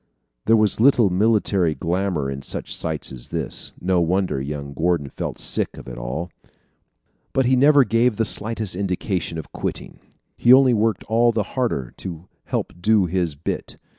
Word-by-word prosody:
There 115 +1 +6
was 110 -1 +2
little 120 -5 +5
military 100 -4 +2
glamor 90 -4 -1
in 70 0 -6
such - - -5
sights 80 -2 -3
as 65 -3 -9
this. - - -2
No 90 -1 +1
wonder, 90 -4 0
young 70 0 -5
Gordon 80 -1 0
felt - - -5
sick - - -2
of - - -11
it 60 - -7
all. 60 +9 -5 1.0
But 135 - +2
he 130 +2 +3
never 140 +2 +6
gave 115 0 +1
the 115 - +2
slightest 110 -2 0
indication 90 -3 -2
of 80 - -8
quitting. - - -5 0.4
He 120 - +3
only 130 -1 +6
worked 110 -2 +1
all 115 +2 +3
the 110 -2 0
harder 70 - -2
to 85 -1 -8 0.2
help - - -3
do 105 0 +3
his 85 -3 -1
bit. 75 - -5
95 Hz, 165 wpm, -22 LUFS, 80-115 Hz, 1.0 s, There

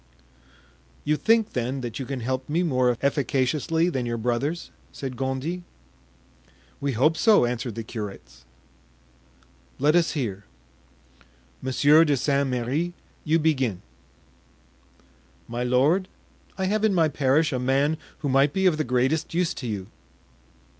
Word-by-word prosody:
"You 150 +1 +1
think, 225 +5 +2
then, 125 +2 -2
that 120 -1 -5
you 130 - -5
can 135 -2 -4
help 130 +3 -3
me 165 +4 +1
more 125 -6 +2
efficaciously 140 +4 +1
than 130 -8 -2
your 120 0 -2
brothers?" 125 +8 -2 0.2
said 130 -2 -6
Gondy. 135 +7 -3 1.2
"We 140 -1 -1
hope 140 +8 +3
so," 205 - +5
answered 120 -1 -3
the 115 - -4
curates. 95 - -8 1.3
"Let 150 +4 +3
us 175 -2 +3
hear. 105 -9 -3 1.2
Monsieur 145 +4 +5
de 145 -3 +2
St. 140 +1 +1
Merri, 135 +8 -1 0.3
you 160 +1 +2
begin." 135 - 0 1.6
"My 120 +1 -3
lord, 140 +10 +2 0.5
I 190 - -1
have 210 +3 0
in 215 -3 +3
my 165 -2 +4
parish 145 +2 +1
a 130 - -1
man 135 +4 +2 0.3
who - - +2
might 135 +2 +3
be 190 0 0
of 175 -4 +4
the 155 - 0
greatest 130 +6 0
use 175 -1 +1
to 125 - -6
you." 100 -4 -4
135 Hz, 140 wpm, -25 LUFS, 125-160 Hz, 1.6 s, so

